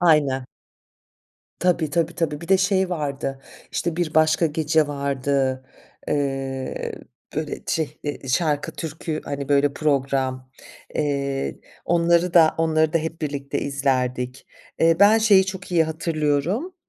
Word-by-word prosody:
Aynen. 145 -6 +3 1.1
Tabii, 170 -4 +1
tabii, 165 +2 0
tabii, 160 -4 -2
bir 170 - -9
de 190 - +5
şey 190 -1 +2
vardı, 140 -4 -3 0.3
işte, 170 -1 -2
Bir 170 -3 -1
Başka 155 +1 +4
Gece 155 0 +1
vardı, 140 -2 -1 0.4
eee, 135 -2 -2 0.4
böyle, 155 -1 -3
şey, 155 -2 -2 0.3
ı - - -8
şarkı, 145 +2 0
türkü, 160 -1 -4
hani, 140 -1 -4
böyle, 140 0 +3
program, 135 -3 -1 0.4
eee, 140 -2 -1 0.2
onları 170 +1 +2
da 160 -2 +6
onları 160 -1 +2
da 165 - +3
hep 160 +1 -5
birlikte 140 -2 -3
izlerdik. 130 -2 -1 0.3
Eee, 165 0 +4
ben 210 +2 +7
şeyi 200 -4 +5
çok 190 -1 -6
iyi 165 -2 +4
hatırlıyorum. 160 - -1
155 Hz, 130 wpm, -23 LUFS, 140-170 Hz, 1.1 s, ben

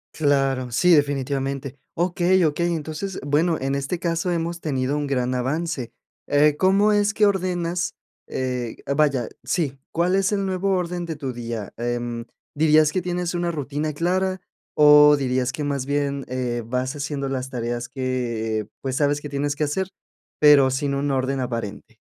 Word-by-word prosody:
Claro, 135 -4 +1
sí, 180 +8 +4
definitivamente. 140 -2 0 0.2
Okey, 180 +1 +2
okey, 170 +3 +1
entonces, 160 +5 -5
bueno, 160 +3 +2
en 135 +1 -1
este 140 +5 -2
caso 170 +1 -1
hemos 170 0 -2
tenido 135 -2 -1
un 145 -1 -1
gran 130 -2 0
avance. 135 0 -2 0.4
Eh, 145 +1 +4
¿cómo 195 +4 +3
es 205 +1 +2
que 215 - +4
ordenas? 180 -2 0 0.3
Eh, 125 -3 -3 0.2
vaya. 140 -6 +2 0.2
Sí. 140 -7 -1
¿Cuál 175 +3 +1
es 195 +1 +2
el 200 -1 0
nuevo 190 +1 -1
orden 175 0 -3
de 160 - -4
tu 135 -4 -4
día? 115 -3 -5
Em, 120 0 -3 0.3
¿dirías 155 0 +4
que 185 - -1
tienes 180 0 -2
una 175 0 -1
rutina 150 0 -3
clara? 185 +4 0 0.4
O, 150 0 +8
dirías 130 -1 0
que 150 +1 -4
más 140 -2 -2
bien, 140 -1 -1
eh, 125 -2 -2
vas 125 +4 -2
haciendo 145 -1 -3
las 130 -1 -3
tareas 120 -1 -3
que 115 -5 -2
pues, 130 -1 -2
sabes 145 0 +2
que 145 0 -8
tienes 145 +1 -1
que 150 - -1
hacer, 185 +6 -1 0.5
pero 145 -3 +7
sin 140 +2 -1
un 140 +1 -1
orden 135 0 0
aparente. 115 -5 -5
145 Hz, 165 wpm, -23 LUFS, 130-170 Hz, 0.5 s, O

